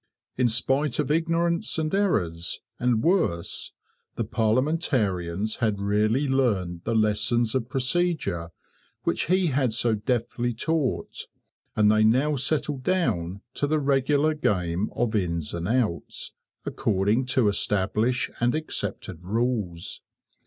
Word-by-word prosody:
In 125 Hz, -1 st, +2 dB
spite 135 Hz, +4 st, +1 dB
of -, -, 0 dB
ignorance, 170 Hz, +2 st, +1 dB
and 155 Hz, +1 st, -1 dB
errors, 90 Hz, -, 0 dB, 0.2 s
and 120 Hz, -2 st, +1 dB
worse, 125 Hz, -, 0 dB, 0.4 s
the -, -, -1 dB
parliamentarians 110 Hz, -, 0 dB
had 110 Hz, -4 st, 0 dB
really 105 Hz, +7 st, +1 dB
learned 100 Hz, -11 st, 0 dB
the 115 Hz, -, 0 dB
lessons 110 Hz, +2 st, +2 dB
of 125 Hz, -3 st, -1 dB
procedure 135 Hz, -, -1 dB, 0.5 s
which -, -, 0 dB
he 185 Hz, +2 st, +3 dB
had 130 Hz, -4 st, +1 dB
so 115 Hz, 0 st, +1 dB
deftly 120 Hz, +2 st, -1 dB
taught, 155 Hz, +1 st, -2 dB, 0.5 s
and 105 Hz, -1 st, +5 dB
they 110 Hz, 0 st, +4 dB
now 130 Hz, +7 st, +3 dB
settled 140 Hz, 0 st, -1 dB
down 100 Hz, -, 0 dB
to 145 Hz, -, -1 dB
the 155 Hz, +2 st, +2 dB
regular 145 Hz, +2 st, +2 dB
game 95 Hz, -, 0 dB
of 120 Hz, -2 st, 0 dB
Ins 85 Hz, -6 st, -1 dB
and 85 Hz, 0 st, -3 dB
Outs, 110 Hz, -7 st, -1 dB, 0.3 s
according 105 Hz, +5 st, +1 dB
to 130 Hz, -3 st, +2 dB
established 105 Hz, +4 st, +1 dB
and 120 Hz, +3 st, +2 dB
accepted 100 Hz, -, -4 dB
rules. 105 Hz, -4 st, -2 dB
120 Hz, 125 wpm, -26 LUFS, 100-140 Hz, 0.5 s, and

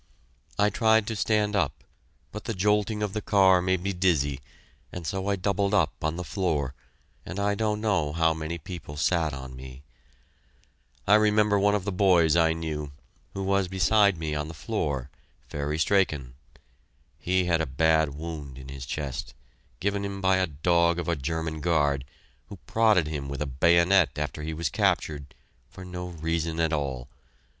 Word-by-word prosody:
I 105 Hz, +1 st, +3 dB
tried 110 Hz, 0 st, +3 dB
to 110 Hz, -, -3 dB
stand 105 Hz, 0 st, +1 dB
up, 80 Hz, -9 st, -1 dB, 0.5 s
but 105 Hz, -, -8 dB
the 115 Hz, -, -3 dB
jolting 105 Hz, +2 st, +1 dB
of 105 Hz, -2 st, -2 dB
the 105 Hz, -, -2 dB
car 95 Hz, -3 st, +4 dB
made 95 Hz, 0 st, 0 dB
me 100 Hz, 0 st, -1 dB
dizzy, 80 Hz, -7 st, +1 dB, 0.5 s
and 90 Hz, -2 st, -7 dB
so 95 Hz, +4 st, -3 dB
I 100 Hz, -, +2 dB
doubled 100 Hz, +1 st, 0 dB
up 100 Hz, -, +2 dB
on 80 Hz, +1 st, 0 dB
the 90 Hz, -, -4 dB
floor, 80 Hz, -8 st, -1 dB, 0.5 s
and 90 Hz, +3 st, -6 dB
I 100 Hz, 0 st, +1 dB
don't 105 Hz, 0 st, -1 dB
know 90 Hz, -9 st, +1 dB
how 80 Hz, +1 st, +2 dB
many 80 Hz, +1 st, -4 dB
people 75 Hz, -3 st, -8 dB
sat 80 Hz, 0 st, +1 dB
on 65 Hz, -2 st, -8 dB
me. 65 Hz, +1 st, -11 dB, 1.2 s
I 100 Hz, -, +4 dB
remember 105 Hz, -1 st, +4 dB
one 100 Hz, +1 st, +3 dB
of 100 Hz, -, -1 dB
the 100 Hz, -, -1 dB
boys 90 Hz, -4 st, +4 dB
I 80 Hz, -1 st, +4 dB
knew, 75 Hz, -3 st, -4 dB, 0.4 s
who 95 Hz, -, -3 dB
was 100 Hz, -1 st, +1 dB
beside 95 Hz, +1 st, +3 dB
me 80 Hz, -1 st, -3 dB
on 75 Hz, 0 st, -2 dB
the 80 Hz, -, -9 dB
floor, 75 Hz, -, -3 dB, 0.4 s
Fairy 75 Hz, +1 st, -3 dB
Strachan. 75 Hz, -8 st, +1 dB, 0.9 s
He 95 Hz, 0 st, +1 dB
had 85 Hz, -2 st, +2 dB
a 80 Hz, -, -2 dB
bad 80 Hz, +1 st, +2 dB
wound 75 Hz, -4 st, -7 dB
in 65 Hz, 0 st, -10 dB
his 70 Hz, -1 st, -8 dB
chest, 70 Hz, -4 st, -5 dB, 0.4 s
given 100 Hz, +1 st, -1 dB
him 100 Hz, 0 st, -4 dB
by 95 Hz, -1 st, +3 dB
a 95 Hz, 0 st, +1 dB
dog 85 Hz, +3 st, +2 dB
of 85 Hz, -, -3 dB
a 85 Hz, -, +1 dB
German 80 Hz, +2 st, -3 dB
guard, 70 Hz, -5 st, +1 dB, 0.4 s
who -, -, -9 dB
prodded 110 Hz, -7 st, +3 dB
him 75 Hz, -3 st, -4 dB
with 70 Hz, -, -5 dB
a 75 Hz, -, -1 dB
bayonet 85 Hz, +3 st, +3 dB
after 75 Hz, +1 st, -3 dB
he 80 Hz, +1 st, -4 dB
was 85 Hz, 0 st, -1 dB
captured, 75 Hz, -2 st, -1 dB, 0.3 s
for 95 Hz, 0 st, -11 dB
no 90 Hz, 0 st, -6 dB
reason 80 Hz, -1 st, -2 dB
at 80 Hz, -1 st, +1 dB
all. 70 Hz, -4 st, -3 dB
85 Hz, 175 wpm, -26 LUFS, 75-100 Hz, 1.2 s, car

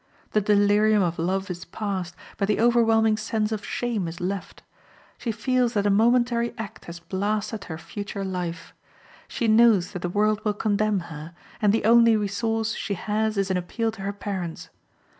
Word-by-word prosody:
The 215 Hz, -, +2 dB
delirium 205 Hz, +1 st, +4 dB
of 170 Hz, -1 st, -2 dB
love 190 Hz, +3 st, -1 dB
is 175 Hz, 0 st, -6 dB
past, 190 Hz, -2 st, -4 dB, 0.2 s
but 200 Hz, -, 0 dB
the 210 Hz, -, +1 dB
overwhelming 225 Hz, -2 st, +4 dB
sense 215 Hz, 0 st, -1 dB
of 215 Hz, -2 st, -3 dB
shame 230 Hz, -7 st, -2 dB
is 165 Hz, +1 st, -7 dB
left; 185 Hz, +1 st, -4 dB, 0.6 s
she 235 Hz, -, -2 dB
feels 245 Hz, +2 st, 0 dB
that 205 Hz, -1 st, +1 dB
a 205 Hz, -, +3 dB
momentary 235 Hz, +2 st, +2 dB
act 220 Hz, -1 st, -7 dB
has 170 Hz, 0 st, -8 dB
blasted 205 Hz, +4 st, -2 dB
her 160 Hz, -, -6 dB
future 200 Hz, +3 st, -6 dB
life; 175 Hz, -3 st, -5 dB, 0.5 s
she 235 Hz, -, -2 dB
knows 220 Hz, -4 st, +5 dB
that 180 Hz, -, -6 dB
the 175 Hz, -, -2 dB
world 210 Hz, +3 st, +1 dB
will 210 Hz, -1 st, 0 dB
condemn 210 Hz, -1 st, +1 dB
her, 155 Hz, +3 st, -9 dB, 0.3 s
and 210 Hz, -2 st, +4 dB
the 220 Hz, 0 st, 0 dB
only 230 Hz, 0 st, +6 dB
resource 220 Hz, +2 st, -1 dB
she 200 Hz, -, -3 dB
has 215 Hz, +3 st, -1 dB
is 195 Hz, -1 st, 0 dB
an 185 Hz, -, +1 dB
appeal 225 Hz, +6 st, -2 dB
to 215 Hz, -, -11 dB
her 200 Hz, +1 st, -2 dB
parents. 190 Hz, -5 st, -5 dB
210 Hz, 180 wpm, -25 LUFS, 190-220 Hz, 0.6 s, only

